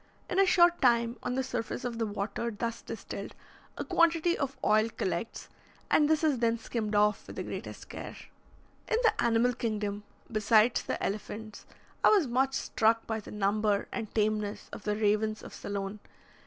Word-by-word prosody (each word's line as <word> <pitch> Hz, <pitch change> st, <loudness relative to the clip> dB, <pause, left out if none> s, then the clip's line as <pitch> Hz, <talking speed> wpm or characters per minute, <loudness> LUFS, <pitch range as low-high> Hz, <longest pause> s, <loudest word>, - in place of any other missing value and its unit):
In 370 Hz, -, 0 dB
a 390 Hz, -, +5 dB
short 345 Hz, -1 st, +5 dB
time, 235 Hz, -2 st, +3 dB
on 250 Hz, -, -2 dB
the 265 Hz, -, 0 dB
surface 245 Hz, -1 st, -4 dB
of 235 Hz, -2 st, -3 dB
the 225 Hz, -, 0 dB
water 210 Hz, +3 st, -3 dB
thus 230 Hz, +1 st, -4 dB
distilled -, -, -7 dB, 0.4 s
a -, -, -3 dB
quantity 335 Hz, 0 st, +3 dB
of 275 Hz, -2 st, -3 dB
oil 215 Hz, +1 st, +4 dB
collects, 225 Hz, +2 st, -3 dB, 0.4 s
and 300 Hz, -1 st, +5 dB
this 315 Hz, 0 st, +2 dB
is 295 Hz, -6 st, +2 dB
then 230 Hz, -1 st, +2 dB
skimmed 220 Hz, -2 st, -3 dB
off 210 Hz, 0 st, +2 dB
with -, -, -9 dB
the -, -, -3 dB
greatest -, -, -7 dB
care. -, -, -7 dB, 0.7 s
In 450 Hz, -, +2 dB
the 455 Hz, -, +5 dB
animal 235 Hz, +1 st, +3 dB
kingdom, 210 Hz, -3 st, -2 dB, 0.3 s
besides 215 Hz, +1 st, +4 dB
the -, -, -4 dB
elephants, 215 Hz, +1 st, -5 dB, 0.4 s
I -, -, +8 dB
was 400 Hz, -7 st, +5 dB
much 265 Hz, +2 st, +1 dB
struck 225 Hz, -2 st, +1 dB
by 220 Hz, -1 st, -2 dB
the 210 Hz, -, -11 dB
number 210 Hz, 0 st, +1 dB
and 225 Hz, -3 st, -4 dB
tameness 210 Hz, -1 st, 0 dB
of -, -, -8 dB
the 210 Hz, 0 st, +1 dB
ravens 215 Hz, 0 st, +1 dB
of -, -, -10 dB
Ceylon. 200 Hz, +1 st, -4 dB
225 Hz, 175 wpm, -30 LUFS, 210-250 Hz, 0.7 s, I